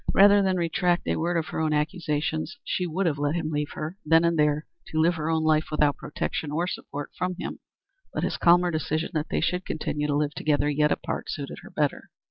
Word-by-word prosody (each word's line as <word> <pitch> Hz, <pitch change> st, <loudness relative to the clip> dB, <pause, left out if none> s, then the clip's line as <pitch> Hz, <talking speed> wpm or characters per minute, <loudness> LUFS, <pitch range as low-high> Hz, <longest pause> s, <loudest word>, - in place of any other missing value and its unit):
Rather 200 Hz, +1 st, +7 dB
than 190 Hz, -1 st, +1 dB
retract 175 Hz, +1 st, +1 dB
a -, -, +1 dB
word 170 Hz, +1 st, 0 dB
of 160 Hz, -, -2 dB
her -, -, -3 dB
own 155 Hz, -1 st, +1 dB
accusations 155 Hz, -, -1 dB
she 180 Hz, -9 st, -1 dB
would 185 Hz, +4 st, -1 dB
have 150 Hz, -4 st, 0 dB
let 145 Hz, +2 st, 0 dB
him 160 Hz, -2 st, -2 dB
leave 150 Hz, 0 st, -1 dB
her, 155 Hz, +5 st, -5 dB
then 165 Hz, +2 st, +4 dB
and 170 Hz, 0 st, +2 dB
there, 150 Hz, -1 st, +2 dB, 0.2 s
to 155 Hz, -, -2 dB
live 165 Hz, +2 st, +4 dB
her 160 Hz, -1 st, -3 dB
own 160 Hz, -1 st, +1 dB
life 155 Hz, 0 st, +3 dB
without 150 Hz, -2 st, +2 dB
protection 150 Hz, 0 st, -4 dB
or 165 Hz, +4 st, 0 dB
support 145 Hz, -5 st, -5 dB
from 180 Hz, 0 st, -2 dB
him, -, -, -5 dB, 0.5 s
but -, -, -3 dB
his -, -, -1 dB
calmer 175 Hz, 0 st, +5 dB
decision 155 Hz, +1 st, -1 dB
that 155 Hz, 0 st, -2 dB
they -, -, 0 dB
should 180 Hz, +2 st, 0 dB
continue 150 Hz, -2 st, -2 dB
to 145 Hz, -, 0 dB
live 150 Hz, 0 st, 0 dB
together, 145 Hz, 0 st, +1 dB
yet 150 Hz, +1 st, +2 dB
apart, -, -, -3 dB
suited 140 Hz, -2 st, -5 dB
her -, -, -12 dB
better. 150 Hz, -2 st, -1 dB
155 Hz, 225 wpm, -26 LUFS, 150-175 Hz, 0.5 s, Rather